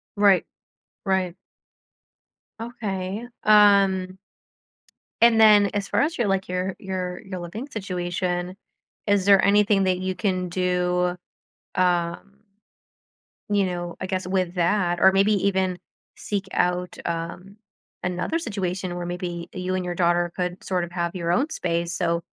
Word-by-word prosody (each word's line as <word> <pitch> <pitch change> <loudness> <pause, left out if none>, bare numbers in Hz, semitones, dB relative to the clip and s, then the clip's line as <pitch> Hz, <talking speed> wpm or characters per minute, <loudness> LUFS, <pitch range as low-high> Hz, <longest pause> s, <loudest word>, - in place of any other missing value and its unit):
Right. 200 -3 +4 0.6
Right. 190 -2 0 1.2
Okay. 210 -2 -4 0.2
Um 195 -3 +4 1.0
and, 230 -1 +6
then, 210 -2 +7
as 200 -1 -2
far - - +1
as 310 +4 0
your, 235 - +1
like, 195 -1 0
your 185 +1 -2
your 185 -2 -4
your 190 -3 -6
living 200 +10 -6
situation, 180 -3 -3 0.5
is 205 -2 +2
there 200 -1 +6
anything 200 0 +4
that 185 -1 +1
you 185 0 -2
can 185 -4 -1
do, 180 0 0 0.6
um 180 +2 0 1.1
you 205 -1 +2
know, 175 -1 -4
I - - -3
guess 185 -1 -3
with 185 -1 -1
that 175 0 +1
or 190 - +6
maybe 195 +2 +3
even 190 -2 0 0.4
seek 200 -2 -4
out, 180 0 0
um, 170 +4 -5 0.5
another 180 - -1
situation 190 - -3
where 175 0 -4
maybe 175 -1 -5
y 185 - -6
you 185 0 -2
and 185 -1 -2
your 175 0 -3
daughter 175 0 +2
could 180 0 -3
sort 180 -2 -1
of 170 - -6
have 170 0 -2
your 170 -2 -1
own 265 - +1
space 170 - -2
so 170 0 0
185 Hz, 140 wpm, -24 LUFS, 180-200 Hz, 1.2 s, then